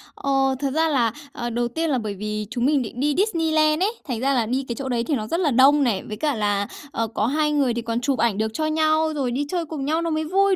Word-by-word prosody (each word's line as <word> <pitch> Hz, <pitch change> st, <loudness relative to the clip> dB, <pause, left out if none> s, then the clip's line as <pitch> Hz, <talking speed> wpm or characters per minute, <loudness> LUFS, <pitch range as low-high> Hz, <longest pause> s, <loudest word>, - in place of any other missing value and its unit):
Ờ, 270 Hz, -1 st, +1 dB
thật 275 Hz, -2 st, -1 dB
ra 320 Hz, +2 st, +2 dB
là, 240 Hz, -6 st, +2 dB, 0.2 s
ờ, 240 Hz, 0 st, -4 dB
đầu 240 Hz, +1 st, -1 dB
tiên 320 Hz, +7 st, -2 dB
là 270 Hz, -, +2 dB
bởi 215 Hz, -4 st, -3 dB
vì 210 Hz, +1 st, -4 dB
chúng 245 Hz, -1 st, -1 dB
mình 285 Hz, -2 st, +3 dB
định 235 Hz, +1 st, -6 dB
đi 290 Hz, +2 st, +1 dB
Disneyland 320 Hz, -5 st, +2 dB
ấy, 415 Hz, -, +2 dB, 0.2 s
thành 245 Hz, -5 st, -2 dB
ra 270 Hz, +3 st, +1 dB
là 240 Hz, -4 st, +2 dB
đi 260 Hz, +4 st, -1 dB
cái 235 Hz, -, -3 dB
chỗ 270 Hz, 0 st, -5 dB
đấy 235 Hz, -2 st, 0 dB
thì 285 Hz, +4 st, 0 dB
nó 215 Hz, -3 st, -3 dB
rất 335 Hz, -, -1 dB
là 325 Hz, -6 st, +2 dB
đông 275 Hz, +4 st, +5 dB
này, 225 Hz, -7 st, 0 dB
với 210 Hz, -, -5 dB
cả 295 Hz, +3 st, 0 dB
là, 205 Hz, -2 st, 0 dB, 0.2 s
ờ, 230 Hz, -4 st, -1 dB
có 220 Hz, -1 st, -1 dB
2 300 Hz, +3 st, +1 dB
người 280 Hz, -5 st, +2 dB
thì 235 Hz, -, -2 dB
còn 230 Hz, +1 st, -2 dB
chụp 270 Hz, -2 st, 0 dB
ảnh 225 Hz, -3 st, +2 dB
được 220 Hz, 0 st, -1 dB
cho 310 Hz, -, -1 dB
nhau, 315 Hz, 0 st, +2 dB
rồi 260 Hz, -4 st, -1 dB
đi 280 Hz, +4 st, -1 dB
chơi 345 Hz, -1 st, -1 dB
cùng 290 Hz, -3 st, -5 dB
nhau 315 Hz, +3 st, +1 dB
nó 335 Hz, -, -1 dB
mới 315 Hz, 0 st, 0 dB
vui, 385 Hz, +4 st, +2 dB
270 Hz, 290 wpm, -23 LUFS, 235-310 Hz, 0.2 s, đông